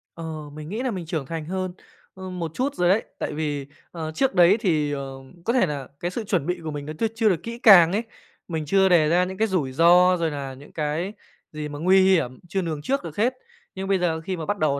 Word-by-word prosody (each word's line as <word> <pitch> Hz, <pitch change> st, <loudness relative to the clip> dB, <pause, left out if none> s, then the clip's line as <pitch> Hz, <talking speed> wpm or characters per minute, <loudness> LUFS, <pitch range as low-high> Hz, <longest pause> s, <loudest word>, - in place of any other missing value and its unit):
Ờ, 160 Hz, -3 st, -6 dB
mình 155 Hz, +1 st, -8 dB
nghĩ 220 Hz, +6 st, -3 dB
là 255 Hz, -, 0 dB
mình 185 Hz, -5 st, -5 dB
trưởng 160 Hz, -3 st, -3 dB
thành 160 Hz, +2 st, -5 dB
hơn, 185 Hz, +2 st, -3 dB, 0.4 s
ơ, 190 Hz, 0 st, -8 dB
một 175 Hz, -3 st, -4 dB
chút 275 Hz, +8 st, -1 dB
rồi 175 Hz, 0 st, +2 dB
đấy. 200 Hz, +4 st, +3 dB, 0.2 s
Tại -, -, -3 dB
vì, 145 Hz, -3 st, -3 dB, 0.2 s
ờ, 160 Hz, -2 st, -5 dB
trước 195 Hz, +7 st, 0 dB
đấy 180 Hz, +3 st, +6 dB
thì, 155 Hz, -8 st, +1 dB
ờ, 140 Hz, -1 st, -3 dB, 0.4 s
có 235 Hz, -, +1 dB
thể 250 Hz, -6 st, +4 dB
là 145 Hz, -4 st, -4 dB
cái 175 Hz, -, -3 dB
sự 225 Hz, -, -4 dB
chuẩn 185 Hz, -8 st, 0 dB
bị 180 Hz, +1 st, -2 dB
của 155 Hz, -, -4 dB
mình 145 Hz, -1 st, -6 dB
nó 155 Hz, -, -5 dB
chưa 225 Hz, -, +2 dB
chưa 225 Hz, -1 st, +3 dB
được 170 Hz, -4 st, -1 dB
kỹ 235 Hz, +1 st, -6 dB
càng 180 Hz, -8 st, +8 dB
ấy. 210 Hz, +4 st, 0 dB, 0.4 s
Mình 160 Hz, -3 st, -3 dB
chưa 190 Hz, +5 st, +3 dB
đề 165 Hz, -4 st, +4 dB
ra 175 Hz, +2 st, +4 dB
những 185 Hz, +1 st, -5 dB
cái 220 Hz, -, +2 dB
rủi 170 Hz, -10 st, -1 dB
ro, 175 Hz, +5 st, +5 dB
rồi 165 Hz, -2 st, 0 dB
là 140 Hz, -2 st, -5 dB
những 140 Hz, +3 st, -14 dB
cái 155 Hz, +5 st, -2 dB, 0.4 s
gì 150 Hz, -1 st, -5 dB
mà 145 Hz, 0 st, -7 dB
nguy 185 Hz, +4 st, +5 dB
hiểm, 165 Hz, -10 st, +2 dB
chưa 195 Hz, -, 0 dB
lường 160 Hz, -4 st, -3 dB
trước 275 Hz, -, -1 dB
được 160 Hz, -3 st, -7 dB
hết. 240 Hz, +5 st, +2 dB, 0.4 s
Nhưng 195 Hz, 0 st, -4 dB
bây 195 Hz, -2 st, +2 dB
giờ 165 Hz, -2 st, 0 dB
khi 185 Hz, +2 st, -4 dB
mà 160 Hz, -, -5 dB
bắt 205 Hz, +3 st, -1 dB
đầu 140 Hz, -2 st, +1 dB
170 Hz, 260 wpm, -24 LUFS, 155-190 Hz, 0.4 s, càng